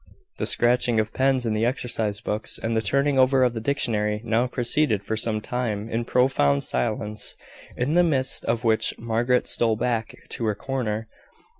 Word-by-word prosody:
The - - -1
scratching 120 -1 +3
of 110 0 -2
pens 130 -1 +1
in 110 - 0
the 110 +1 0
exercise 115 -4 -1
books, 105 +1 -1
and 115 0 -2
the 110 - +2
turning 140 +5 +1
over 130 0 +4
of 125 -2 +2
the 115 - -4
dictionary, 105 -5 0
now 115 +2 +1
proceeded 125 -3 +2
for 110 - -2
some 110 0 0
time 110 -3 -3
in 115 +1 -2
profound 120 - +2
silence, 105 - -3 0.4
in 130 +5 0
the 175 +1 +5
midst 135 -5 +2
of 115 +1 -1
which 110 -1 +1
Margaret 120 +2 0
stole 115 -2 +1
back 115 0 -2
to 115 - -4
her 105 -1 0
corner. 115 -3 -3
115 Hz, 175 wpm, -24 LUFS, 110-125 Hz, 0.4 s, the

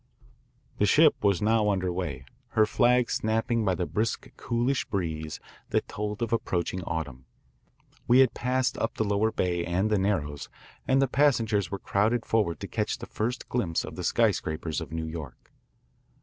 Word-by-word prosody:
The 105 - +3
ship 155 +5 +5
was 100 -2 +2
now 110 -1 +3
under 95 -3 0
way, 80 -8 -4 0.3
her 110 - +6
flags 125 +2 +3
snapping 110 0 0
in 95 - +2
the 90 - -1
brisk 110 +5 -2
coolish 120 +3 0
breeze 80 -6 -3 0.3
that - - 0
told 105 +1 -4
of 115 - -2
approaching 90 -4 -1
autumn. 75 -6 -4 0.8
We 120 - +6
had 130 -3 +4
passed 125 0 0
up 115 - -1
the - - 0
lower 105 +1 +1
bay 90 -4 0
and 95 +5 0
the 105 - +3
Narrows, 75 -8 -1 0.4
and 135 +1 +4
the - - +2
passengers 115 - +2
were 100 - -3
crowded 110 +5 0
forward 100 -8 +1
to - - -4
catch - - -2
the - - -8
first 120 +3 -3
glimpse 95 -10 -1
of - - -8
the - - -5
skyscrapers 80 +1 0
of 80 -3 -7
New 80 0 -3
York. 80 -5 -8
105 Hz, 170 wpm, -27 LUFS, 85-115 Hz, 0.8 s, her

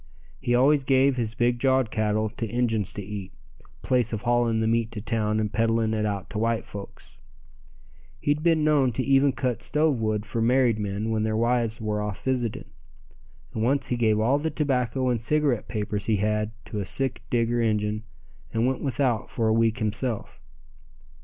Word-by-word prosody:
He 120 - +1
always 140 +3 +4
gave 135 0 +3
his 115 -3 -2
big 120 0 +1
jawed 130 -3 +2
cattle 110 0 0
to 115 +1 -4
Injuns 110 -4 0
to 100 - -5
eat, 100 -1 -6 0.5
place 125 -3 +1
of 110 -1 -4
hauling 120 -2 +2
the 110 - +1
meat 115 0 +1
to 110 - -4
town 110 0 -1
and 105 -1 -2
peddling 115 -1 +1
it 105 -1 0
out 100 -2 -3
to 105 - -3
white 115 0 0
folks. 100 -1 -10 1.0
He'd 145 +1 0
been 165 -1 +3
known 145 -5 +3
to 130 - -1
even 135 +1 +4
cut 125 -2 -2
stove 150 -4 +1
wood 110 -1 -1
for 115 +1 -3
married 120 -1 +3
men 105 +2 -2
when 110 -1 0
their 110 0 0
wives 115 -1 +1
were 105 -1 -2
off 105 -2 -5
visiting, 125 -4 -1 0.9
and 110 - -3
once 135 +5 +1
he 125 - +1
gave 110 -3 +2
all 125 +6 +2
the 160 +2 -1
tobacco 130 -4 0
and 120 -3 0
cigarette 145 -2 +1
papers 105 -2 -3
he 110 - +3
had 105 +1 0 0.2
to 105 - -5
a - - -1
sick 135 +5 -2
Digger 120 0 +1
Injun 105 -1 0 0.5
and 115 +1 +1
went 130 0 0
without 130 -4 0
for 115 -2 -1
a - - +3
week 115 0 +2
himself. 110 +1 -2
115 Hz, 185 wpm, -26 LUFS, 110-130 Hz, 1.0 s, always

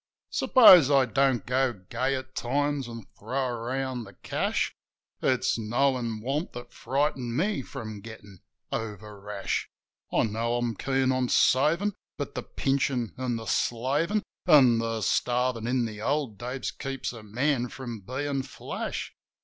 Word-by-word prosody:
Suppose 185 - +8
I 135 -2 +5
don't 135 -4 +1
go 130 0 +1
gay 125 +7 -2
at 130 0 -6
times 140 +1 -1
an' 115 -1 -7 0.2
throw 130 +4 -1
around 125 +1 -3
the 100 -3 -13
cash: - - -1 0.5
It's 130 -2 +1
knowin' 120 0 0
want 140 - -2
that 120 0 -9
frightened 130 -3 -1
me 200 -2 +1
from 110 -4 -7
gettin' 105 -4 -11 0.3
over 105 -2 -5
rash. 100 -1 -3 0.4
I - - +3
know 115 +2 -1
I'm 120 -1 0
keen 130 +3 +1
on 130 -1 0
savin'; 165 +10 +3 0.2
but - - -4
the - - -3
pinchin' 135 -4 -1
an' 125 -2 -2
the 115 -1 -5
slavin' 145 - 0 0.2
An' 130 -8 +7
the 115 -1 -2
starvin' 125 0 +1
in 125 -1 +1
the 105 -2 -6
old 135 -4 -1
days 120 -4 -4
keeps 135 +1 -4
a 115 - -9
man 125 +4 0
from 120 -4 -7
bein' 135 +6 -2
flash. - - -5
125 Hz, 145 wpm, -27 LUFS, 115-135 Hz, 0.5 s, Suppose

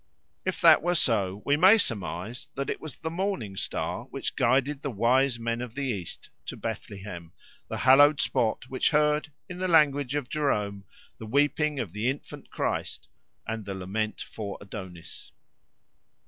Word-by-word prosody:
If 185 - -1
that 165 -3 +8
were 175 +3 +1
so, 100 - +1
we 145 - +4
may 190 +7 +7
surmise 110 - -3
that 140 0 -2
it - - -5
was 155 -4 -7
the 160 - -4
Morning 170 - -2
Star - - -3
which - - -5
guided 135 +4 +2
the 145 - -3
wise 125 +3 +2
men 115 0 -2
of 125 -1 -7
the 140 - -2
East 100 -10 -5 0.2
to - - -5
Bethlehem, 90 -4 -6 0.3
the - - -4
hallowed 145 +3 +6
spot 125 -1 0
which 130 0 +1
heard, 150 +1 +2 0.2
in 180 -1 -8
the 185 - 0
language 145 -5 +3
of 145 -4 -2
Jerome, 105 -10 -1 0.3
the 110 - -7
weeping 145 +3 +1
of 110 -9 -3
the 105 +4 0
infant 140 +2 -6
Christ - - -3 0.4
and 110 -1 -4
the 100 -1 -5
lament 105 +4 -3
for 100 -3 -6
Adonis. 95 -5 -9
125 Hz, 160 wpm, -27 LUFS, 105-150 Hz, 0.4 s, that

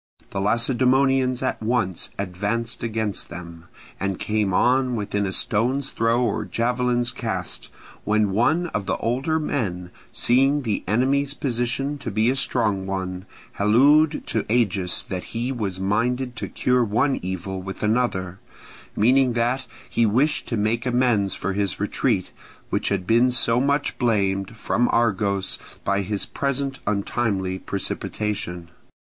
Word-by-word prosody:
The 100 - -2
Lacedaemonians 130 +3 +2
at 130 - -1
once 110 -6 0
advanced 100 +5 -2
against 110 -3 -2
them, 85 -1 -9 0.3
and 95 -1 -1
came 105 -2 0
on 125 +5 +2
within 105 -2 -1
a - - -2
stone's 125 +8 0
throw 115 +2 +1
or 115 -4 0
javelin's 120 0 0
cast, - - -4 0.3
when 105 -1 +2
one 155 - +2
of 105 -7 -3
the - - 0
older 135 +7 0
men, 90 - -2 0.2
seeing 135 +4 +3
the 110 -4 -1
enemy's 135 +6 +1
position 135 +3 -1
to - - -5
be 110 +4 +2
a - - -1
strong 110 -7 0
one, 95 -1 -4 0.3
hallooed 145 +9 +4
to 110 - -1
Agis 100 -7 +1
that 90 -2 -5
he 120 +3 -1
was 100 -7 -3
minded 120 +6 0
to - - -4
cure 125 -1 +2
one 115 +6 +1
evil 95 +1 -4
with 95 +2 -7
another; 105 -5 0 0.6
meaning 125 +3 +4
that 120 +2 0 0.2
he 115 - +2
wished 130 +9 +1
to 115 - -2
make 115 +4 0
amends 120 -6 +2
for 95 - -2
his 100 -1 -1
retreat, - - 0 0.4
which - - 0
had 90 - -1
been 115 +5 +4
so 120 -1 +3
much 140 +1 +1
blamed, 100 -2 0
from 120 +2 +1
Argos, 100 -4 +1 0.2
by 100 0 +1
his 100 +1 -2
present 140 -1 -2
untimely 100 -2 -1
precipitation. 95 -3 -4
115 Hz, 140 wpm, -23 LUFS, 100-125 Hz, 0.6 s, hallooed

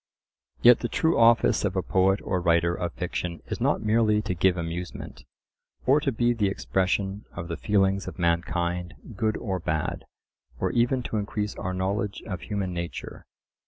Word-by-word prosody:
Yet 120 0 +8
the 120 - -3
true 160 0 +1
office 115 0 +5
of - - -1
a - - 0
poet 95 +2 +2
or 90 -2 -1
writer 85 0 +3
of 85 -1 -3
fiction 85 -1 -4
is - - -5
not - - +1
merely 110 -1 +3
to 105 - -2
give 90 +1 +2
amusement, 85 +1 -6 0.6
or 135 +4 +5
to 140 -2 0
be 120 0 +2
the 105 -4 +1
expression 95 +1 -1
of 85 -1 -6
the 85 - -2
feelings 95 +1 +1
of - - -7
mankind, 85 0 -1 0.2
good 110 +2 0
or 95 -4 -3
bad, 80 -2 -2 0.5
or - - 0
even 120 +2 +1
to 110 - -3
increase 105 0 -2
our 95 0 -4
knowledge 100 +2 -2
of 95 -6 -5
human 100 -4 -3
nature. 85 -1 -6
95 Hz, 170 wpm, -26 LUFS, 90-110 Hz, 0.6 s, Yet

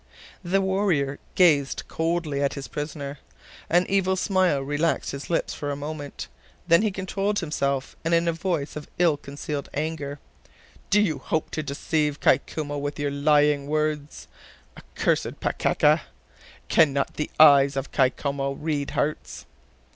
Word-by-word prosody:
The 190 +2 +1
warrior 190 -8 0 0.2
gazed 150 -7 +3
coldly 160 -3 -1
at 140 - 0
his 140 - -6
prisoner. 145 -1 -5 0.5
An 175 +2 +4
evil 190 -1 +2
smile 185 -5 +2
relaxed 145 +4 -1
his 140 0 -7
lips 170 - 0
for 145 - -4
a 145 - -2
moment; 145 0 -6 0.4
then 170 +1 +6
he 215 - +2
controlled 195 +2 -2
himself, 140 -5 -1
and 165 - -1
in 170 0 +3
a 170 - +2
voice 165 -4 -2
of 150 - -7
ill 170 -3 +4
concealed 145 0 -6
anger: 145 -1 -3 0.7
"Do 205 - +4
you 160 -9 0
hope 155 +4 -2
to 155 - -2
deceive 150 +1 -1
Kai - - +4
Koumou 145 -2 -5
with 145 0 -4
lying 145 0 +2
words, 150 -1 -2 0.5
accursed - - -2
Pakeka? - - +2 0.7
Can 155 -4 +4
not 140 0 -1
the 150 - -3
eyes 140 -2 +7
of 135 - -3
Kai 130 -3 +4
Koumou 140 0 -3
read 150 -3 -2
hearts?" 150 +1 -2
150 Hz, 145 wpm, -25 LUFS, 140-170 Hz, 0.7 s, eyes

